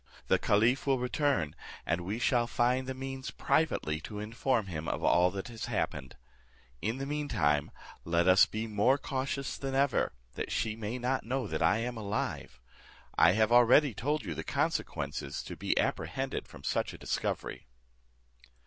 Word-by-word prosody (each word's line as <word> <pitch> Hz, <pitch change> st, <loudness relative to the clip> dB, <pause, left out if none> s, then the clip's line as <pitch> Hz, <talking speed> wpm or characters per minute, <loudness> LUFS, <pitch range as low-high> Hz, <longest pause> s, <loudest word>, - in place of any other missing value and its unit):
The -, -, +4 dB
caliph 115 Hz, +7 st, +2 dB
will 135 Hz, -1 st, +4 dB
return, 125 Hz, -, 0 dB, 0.3 s
and 85 Hz, -, 0 dB
we 100 Hz, +5 st, -3 dB
shall 120 Hz, -1 st, +2 dB
find 125 Hz, +2 st, +1 dB
the 130 Hz, -, -3 dB
means 135 Hz, 0 st, -5 dB
privately 80 Hz, -, 0 dB
to 105 Hz, -, -7 dB
inform 115 Hz, +2 st, 0 dB
him 80 Hz, -4 st, -5 dB
of -, -, -2 dB
all 90 Hz, +1 st, +5 dB
that 95 Hz, +3 st, -5 dB
has 115 Hz, -2 st, -6 dB
happened. 65 Hz, -3 st, -3 dB, 0.7 s
In 115 Hz, +4 st, -1 dB
the 135 Hz, -, -3 dB
mean 150 Hz, +1 st, -2 dB
time 75 Hz, -, +1 dB, 0.3 s
let 85 Hz, +1 st, +1 dB
us 95 Hz, 0 st, +7 dB
be 110 Hz, +1 st, -3 dB
more 110 Hz, +5 st, +3 dB
cautious 135 Hz, 0 st, -3 dB
than 135 Hz, -1 st, -3 dB
ever, 140 Hz, -, +2 dB, 0.2 s
that -, -, -4 dB
she 110 Hz, -1 st, -1 dB
may 110 Hz, +2 st, -4 dB
not 125 Hz, +2 st, -1 dB
know 125 Hz, 0 st, -2 dB
I 85 Hz, +2 st, +2 dB
am 120 Hz, +1 st, -3 dB
alive. 100 Hz, -, -3 dB, 0.6 s
I -, -, +6 dB
have 110 Hz, +2 st, +2 dB
already 120 Hz, +3 st, +6 dB
told 145 Hz, +8 st, -1 dB
you 85 Hz, -, -3 dB
the -, -, -5 dB
consequences 70 Hz, +1 st, -2 dB
to -, -, -7 dB
be -, -, -1 dB
apprehended -, -, -2 dB
from -, -, -13 dB
such -, -, -1 dB
a -, -, -9 dB
discovery." -, -, -3 dB
115 Hz, 165 wpm, -31 LUFS, 95-130 Hz, 0.7 s, us